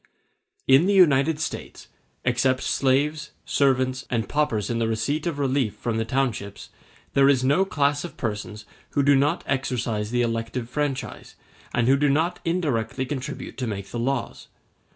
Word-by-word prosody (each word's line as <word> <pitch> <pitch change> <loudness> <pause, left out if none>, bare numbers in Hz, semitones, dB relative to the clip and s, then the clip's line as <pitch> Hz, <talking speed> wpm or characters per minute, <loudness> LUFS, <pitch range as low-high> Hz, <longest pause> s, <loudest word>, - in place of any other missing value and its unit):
In 135 +7 +6
the 200 - +3
United 150 -4 +4
States, 160 - -5 0.4
except 130 +1 +1
slaves, 150 +3 0
servants, 130 -2 +1
and 115 -3 -1
paupers 140 -9 0
in 115 - -1
the 115 - +1
receipt 140 +9 -1
of 165 -4 -2
relief 135 -5 0
from 115 -2 -3
the 115 - -1
townships, 115 -6 -2 0.4
there 140 0 +5
is 130 -2 +3
no 145 +9 +3
class 145 -5 0
of 175 - -8
persons 105 -1 -4 0.3
who 140 - +4
do 140 0 +5
not 145 +5 +1
exercise 120 -5 -1
the 120 +1 +1
elective 115 +1 -2
franchise, 135 +1 -4 0.4
and 120 -1 +1
who 135 +1 +5
do 145 +1 +2
not 160 +5 +1
indirectly 140 -9 -1
contribute 140 +1 -6
to 125 - -2
make 100 -3 -5
the 120 - -3
laws. 125 0 -2
130 Hz, 160 wpm, -24 LUFS, 115-145 Hz, 0.4 s, In